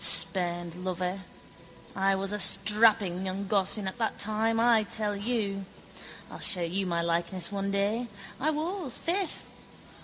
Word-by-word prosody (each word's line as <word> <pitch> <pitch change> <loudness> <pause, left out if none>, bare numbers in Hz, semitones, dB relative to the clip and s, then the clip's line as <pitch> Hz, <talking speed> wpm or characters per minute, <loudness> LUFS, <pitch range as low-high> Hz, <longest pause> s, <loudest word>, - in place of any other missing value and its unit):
Spurned 175 0 +3
lover. 185 +1 -3 0.7
I 195 0 +2
was 195 +1 -2
a 210 - -2
strapping 205 -3 +4
young 190 +1 -3
gossoon 200 0 +1
at 190 +6 -6
that 225 - -1
time, 220 +2 -1
I 230 -1 +4
tell 210 0 -2
you. 200 -2 -2 0.7
I'll - - -9
show 185 -4 +1
you 185 +3 -2
my 170 -1 -1
likeness 170 +2 0
one 200 0 -2
day. 205 +5 -1 0.3
I 300 - +1
was, 315 -1 -2
faith. 365 +1 -2
200 Hz, 145 wpm, -28 LUFS, 185-225 Hz, 0.7 s, strapping